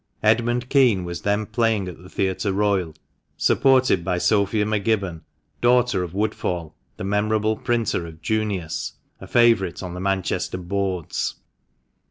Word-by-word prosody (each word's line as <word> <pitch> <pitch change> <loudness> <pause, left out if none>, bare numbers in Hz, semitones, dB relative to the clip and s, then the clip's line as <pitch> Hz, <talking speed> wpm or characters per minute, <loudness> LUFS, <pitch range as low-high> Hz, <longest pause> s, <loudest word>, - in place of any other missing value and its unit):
Edmund 120 +3 +2
Kean 125 -10 +3
was 85 0 -5
then 105 +1 0
playing 110 -3 0
at 90 -2 -9
the 90 - -13
Theatre 95 +1 -1
Royal, 95 -5 0 0.4
supported 130 -9 +3
by 90 -1 -1
Sophia 105 +2 +2
M'Gibbon 100 -5 -1 0.2
— - - -43
daughter 120 -5 +3
of 90 0 -5
Woodfall, 90 -6 -2 0.2
the - - -6
memorable 105 +2 +1
printer 115 -8 -1
of 80 -1 -12
"Junius" 100 -4 -2
— - - -39
a - - -9
favourite 115 -7 +3
on 90 -1 -5
the 90 - -6
Manchester 95 -1 -1
"boards." 95 -1 -2
100 Hz, 145 wpm, -23 LUFS, 90-110 Hz, 0.4 s, Kean